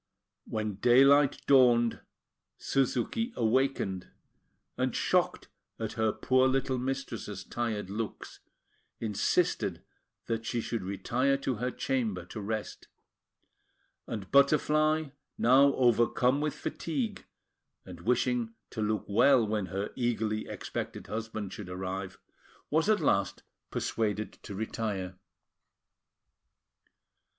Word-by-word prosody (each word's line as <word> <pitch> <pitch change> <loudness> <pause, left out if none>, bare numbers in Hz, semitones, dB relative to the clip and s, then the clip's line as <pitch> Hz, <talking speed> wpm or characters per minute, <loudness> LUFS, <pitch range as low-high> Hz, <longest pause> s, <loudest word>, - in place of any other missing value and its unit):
When 110 -3 -3
daylight 135 +5 +5
dawned, 120 -4 +5 0.6
Suzuki 135 - 0
awakened, 115 -6 0 0.7
and, - - -1
shocked - - +1 0.3
at - - -4
her 110 -1 +1
poor 130 +4 +2
little 130 -1 0
mistress's 125 -6 -4
tired 110 -5 -3
looks, 110 +1 -5 0.6
insisted 105 -3 0 0.4
that 115 -1 -2
she 120 +1 -2
should 115 -1 -3
retire 120 +9 0
to 135 -3 -2
her 125 +3 -1
chamber 115 -9 -2
to 110 - -5
rest; 110 +1 -4 1.2
and 100 -4 -6
Butterfly, 155 +2 +3 0.3
now 135 +3 +5
overcome 125 +2 +3
with 150 -1 -1
fatigue, 210 +6 -4 0.6
and 90 -2 -10
wishing 120 +1 0 0.2
to 110 - -4
look 105 -1 -1
well 120 +4 +5
when 105 -2 -1
her 100 +2 -3
eagerly 110 -3 -1
expected - - -5
husband 110 -3 -5
should 100 -4 -8
arrive, 95 +1 -5 0.5
was 160 +6 +2
at 215 -1 +3
last 100 -1 +1 0.3
persuaded 110 -1 -2
to 100 - -8
retire. 100 -4 -3
115 Hz, 105 wpm, -30 LUFS, 105-135 Hz, 1.2 s, daylight